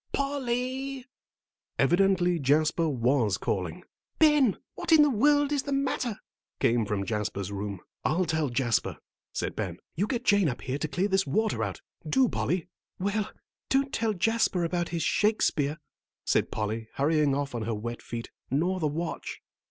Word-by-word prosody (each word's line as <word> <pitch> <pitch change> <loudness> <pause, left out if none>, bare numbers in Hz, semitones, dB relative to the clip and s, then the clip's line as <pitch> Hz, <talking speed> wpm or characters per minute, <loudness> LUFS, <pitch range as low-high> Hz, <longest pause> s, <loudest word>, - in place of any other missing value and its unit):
"Pol 280 -1 -1
ly." 255 +2 -2 0.7
Evidently 180 -2 +3
Jasper 155 +3 +2
was 125 -5 +2
calling. - - -2 0.3
"Ben, 295 -8 +5 0.2
what - - -4
in 315 -2 +8
the 295 - +3
world 290 +4 +3
is 290 -2 +2
the 280 - -5
matter?" 260 -5 0 0.4
came 115 -2 +2
from 100 -1 -1
Jasper's 105 -3 -2
room. 100 -1 -4 0.2
"I'll 180 +4 +2
tell 160 -3 0
Jasper," 120 -2 0 0.3
said - - -3
Ben. - - -3 0.2
"You 200 +6 0
get 245 0 -2
Jane 200 -7 +4
up 125 - -5
here 130 +3 -3
to 155 - -1
clear 175 +7 0
this 190 -1 +1
water 220 +1 +1
out; - - -4 0.3
do, 265 -1 +4
Polly." 160 - -1 0.3
"Well, 200 +2 -1 0.4
don't 270 0 +1
tell 225 -1 +1
Jasper 220 -2 +1
about 175 +1 -1
his 170 -1 -2
Shakespeare," 155 -9 +2 0.5
said - - +2
Polly, 110 +1 -3
hurrying 145 -1 +2
off 140 -1 -2
on 120 - -3
her 110 +1 -2
wet 120 +3 -5
feet, 115 -1 -6 0.2
"nor 175 +8 +1
the 155 - +1
watch." 160 +3 -4
175 Hz, 160 wpm, -28 LUFS, -, 0.7 s, in